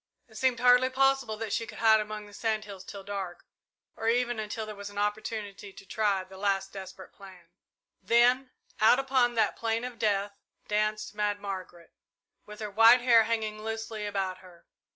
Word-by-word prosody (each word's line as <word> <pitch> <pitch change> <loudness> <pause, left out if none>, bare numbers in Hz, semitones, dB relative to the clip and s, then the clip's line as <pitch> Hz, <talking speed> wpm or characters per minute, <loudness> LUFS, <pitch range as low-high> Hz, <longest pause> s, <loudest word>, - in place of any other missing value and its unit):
It 220 - -20
seemed 255 0 +1
hardly 250 +1 +5
possible 265 -4 +1
that 220 -1 -4
she 230 - -1
could - - -10
hide 220 -1 +5
among 210 0 -5
the 205 - -15
sand 215 0 -2
hills 195 -3 -9
till 195 0 -9
dark, 195 -3 -6 0.5
or 225 - -4
even 240 -1 +1
until 215 +1 -4
there 215 - -7
was 200 0 -8
an 205 - -13
opportunity 210 -1 -3
to 195 - -14
try 200 -2 0
the 190 0 -14
last 195 -1 -1
desperate 190 -1 -10
plan. 185 -4 -15 0.5
Then 245 +3 +3 0.3
out 220 +3 +6
upon 260 -3 +2
that 220 -2 +2
plain 225 0 -1
of 250 -1 -7
death 205 -1 +1 0.4
danced 215 0 -1
Mad 210 -1 -1
Margaret, 185 -4 -7 0.5
with 210 +1 -10
her 210 -1 -4
white 225 +4 +7
hair 235 -3 +5
hanging 215 -2 -2
loosely 220 -1 -4
about 195 -2 -3
her. 180 -2 -17
215 Hz, 180 wpm, -29 LUFS, 200-230 Hz, 0.5 s, white